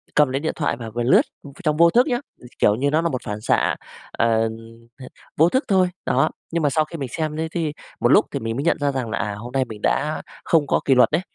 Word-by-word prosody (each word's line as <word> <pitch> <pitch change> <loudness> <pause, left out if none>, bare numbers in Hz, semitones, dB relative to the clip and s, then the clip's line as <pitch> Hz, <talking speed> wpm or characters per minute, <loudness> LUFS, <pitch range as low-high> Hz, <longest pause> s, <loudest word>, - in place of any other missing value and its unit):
cầm 150 -3 +5
lấy 135 - -1
điện 160 +2 -2
thoại 150 - -1
và 115 -2 -7
vừa 120 +2 -3
lướt, 125 - +5 0.2
ừ, 145 - -10
trong 150 -2 +1
vô 170 +1 +6
thức 245 - +3
nhá, 245 -3 0 0.2
ừ, - - -16
kiểu 105 - +4
như 140 +5 0
nó 155 +2 +2
là 170 - 0
một 130 - -3
phản 105 0 -5
xạ, 115 - +1 0.4
ờ, 115 -1 +1 0.5
h - - -10 0.3
vô 165 +3 +5
thức 260 +7 +1
thôi. 185 -3 +3 0.2
Đó, 155 - +2 0.2
nhưng 165 -1 -1
mà 145 - +3
sau 155 +2 +1
khi 165 +2 -8
mình 135 -4 -4
xem 155 -1 -2
thế 160 0 -1
thi 160 -4 -2 0.3
một - - +2
lúc - - +6
thì - - -3
mình 115 0 -3
mới 140 - -2
nhận 170 - +2
ra 145 -1 +1
rằng 130 -4 -3
là, 115 - -2
à, 100 0 -2
hôm 120 +3 -8
nay 130 0 +1
mình 110 -3 -10
đã 150 +2 0 0.2
không 155 -4 +2
có - - +2
kỷ 135 - +4
luật 125 - +5
đấy, 160 +4 +1
145 Hz, 280 wpm, -22 LUFS, 120-160 Hz, 0.5 s, vô